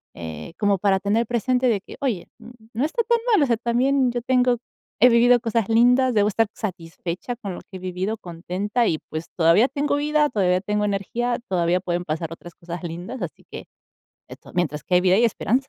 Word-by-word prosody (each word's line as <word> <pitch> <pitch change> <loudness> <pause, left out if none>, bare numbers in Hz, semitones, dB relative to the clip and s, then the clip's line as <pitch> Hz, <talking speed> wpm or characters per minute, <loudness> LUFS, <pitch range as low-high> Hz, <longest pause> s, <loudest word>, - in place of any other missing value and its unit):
eh, 80 - -7
como 205 -2 +2
para 195 0 +2
tener 205 +4 +1
presente 250 +2 +1
de 215 -5 +1
que - - -12
oye, 235 -11 -2 0.5
no 245 +6 0
está 330 +10 -1
tan 470 +1 +2 0.2
mal, 360 - +5
o - - +4
sea, 235 - +2
también 250 +3 +1
yo 240 0 -3
tengo, 250 0 +2 0.4
he 250 - +8
vivido 240 +1 +5
cosas 230 -3 0
lindas, 245 +3 +4
debo 210 -1 +3
estar 225 +1 +1
satisfecha 180 +2 -5
con 205 -6 -6
lo - - -9
que 190 - -11
he - - -11
vivido, 185 +4 -3
contenta 190 +5 -2
y 155 - 0
pues 155 +1 -4
todavía 170 +8 +5
tengo 285 +2 -1
vida, 300 0 +2
todavía 185 -6 +1
tengo 210 +1 -1
energía, 230 +5 -1
todavía 175 -1 +1
pueden 175 -1 -2
pasar 160 +1 -3
otras 170 +1 -10
cosas 170 0 -7
lindas, 175 +9 -6
así 165 - -7
que, - - -8 0.6
esto, - - -13
mientras 155 -4 -1
que 180 - +1
hay - - +5
vida 185 0 +3
hay 225 +5 +4
esperanza. 250 +4 0
210 Hz, 205 wpm, -23 LUFS, 180-245 Hz, 0.6 s, he